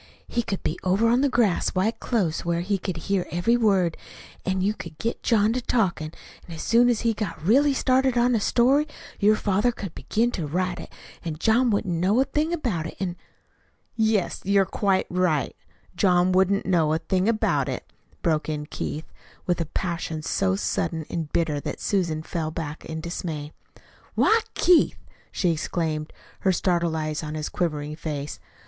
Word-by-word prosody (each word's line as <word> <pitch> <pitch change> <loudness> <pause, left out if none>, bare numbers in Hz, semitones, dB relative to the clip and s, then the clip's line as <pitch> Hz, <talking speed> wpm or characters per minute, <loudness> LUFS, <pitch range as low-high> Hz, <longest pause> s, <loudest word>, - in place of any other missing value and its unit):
He 235 - 0
could 200 -4 -4
be - - -2
over 195 +5 +3
on 245 +2 +3
the 285 - +3
grass 230 -9 +1
right 195 +5 +2
close, 190 -10 0
where 170 0 0
he 195 +2 -1
could 185 -2 -4
hear 190 +2 -1
every 175 +8 +2
word; 195 -8 +2 0.5
an' 190 -1 0
you 200 +3 +2
could 170 -7 -9
get 230 - -3
John 220 -1 +3
to 255 - -1
talkin', 180 -11 0 0.4
an' 170 - -7
as 160 - -6
soon 240 +1 +4
as 235 -3 +1
he 230 -1 +2
got 200 -6 -4
really 275 - +4
started 260 -1 +2
on 245 +1 +3
a 225 - +3
story 265 +8 +3 0.3
your 215 +1 +5
father 205 +4 +1
could 200 -7 -7
begin 235 +3 0
to 165 -9 -3
write, 180 +3 -2 0.3
an' 165 -3 -3
John 230 +8 +3
wouldn't 200 -4 0
know 185 +7 +2
a 265 - +4
thing 300 +4 0
about 230 - -1
it; - - -10
an' 180 -3 -2 0.5
" - - -42
"Yes, 220 -4 +1
you're 195 0 +3
quite 195 0 +1
right 175 -6 +1 0.4
John 180 -1 +3
wouldn't 190 +2 +3
know 165 -4 +2
a - - +2
thing 185 +5 0
about 220 -1 +1
it," - - -6 0.3
broke 155 -4 +1
in 150 -1 -3
Keith, 150 +1 -5 0.4
with 175 -1 0
a 165 - -2
passion 165 -3 -3
so 190 +3 +1
sudden 165 -5 -1
and 160 -3 -3
bitter 160 -4 +1
that - - -5
Susan 170 -6 0
fell 160 -1 -3
back 155 -1 -5
in 160 0 -5
dismay. 160 -3 -5 0.6
"Why, 450 - +5 0.2
Keith!" 355 -1 +4 0.3
she 180 - +1
exclaimed, 155 -1 -2 0.3
her 190 - +2
startled 175 -2 +1
eyes 155 -1 -2
on 155 -1 -5
his 155 0 -3
quivering 150 -3 -2
face. 150 -3 -5
185 Hz, 180 wpm, -25 LUFS, 165-220 Hz, 0.6 s, your